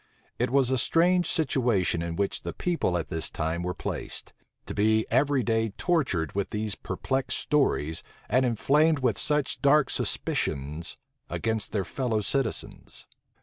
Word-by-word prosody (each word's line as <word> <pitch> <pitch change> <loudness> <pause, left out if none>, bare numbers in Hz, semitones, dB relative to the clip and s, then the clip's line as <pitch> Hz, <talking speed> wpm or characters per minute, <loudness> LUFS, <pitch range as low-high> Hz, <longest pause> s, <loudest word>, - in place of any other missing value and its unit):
It - - +1
was 130 0 +2
a 130 - +2
strange 175 +5 +3
situation 120 - +1
in 85 0 -3
which 100 +1 -1
the - - -5
people 165 - 0
at 85 - -4
this 80 -1 -4
time 80 +2 -2
were 90 0 -3
placed; - - -6 0.3
to - - -5
be 110 +1 +2
every 135 +1 +3
day 115 -1 +1
tortured 130 - 0
with 100 0 -1
these 105 -1 -2
perplexed 130 +9 -2
stories, 110 - +1 0.3
and 130 +4 +3
inflamed 145 +6 +3
with 125 -6 0
such 150 -3 0
dark 140 -1 +4
suspicions 75 - -1 0.3
against 110 -1 -2
their 100 -3 -1
fellow 115 0 -1
citizens. 135 +3 -2
115 Hz, 145 wpm, -27 LUFS, 95-140 Hz, 0.3 s, dark